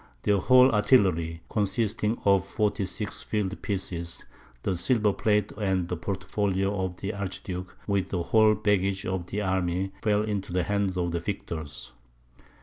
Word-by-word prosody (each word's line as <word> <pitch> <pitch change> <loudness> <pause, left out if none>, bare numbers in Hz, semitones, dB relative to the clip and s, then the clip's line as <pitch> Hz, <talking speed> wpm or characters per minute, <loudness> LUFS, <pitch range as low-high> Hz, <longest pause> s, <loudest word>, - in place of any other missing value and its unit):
Their 100 -1 +3
whole 130 +5 +6
artillery, 95 -8 +3
consisting 105 +1 0
of 100 -1 +4
46 105 0 -2
field 100 -2 -2
pieces, 90 -4 -3 0.4
the 95 - 0
silver 105 +2 +2
plate 105 -1 +1
and 95 -4 0
portfolio 95 0 -1
of 90 -1 -4
the 100 +3 -4
archduke, 95 -1 -5
with 100 -2 0
the 90 -3 -1
whole 110 +1 +4
baggage 100 -2 +1
of 95 -2 -2
the 105 +2 -2
army, 95 0 0
fell 105 -1 +2
into 100 -4 -3
the 90 -1 +1
hands 100 -1 0
of 85 -1 0
the 85 - -1
victors. 70 -7 -5
95 Hz, 145 wpm, -27 LUFS, 90-105 Hz, 0.4 s, whole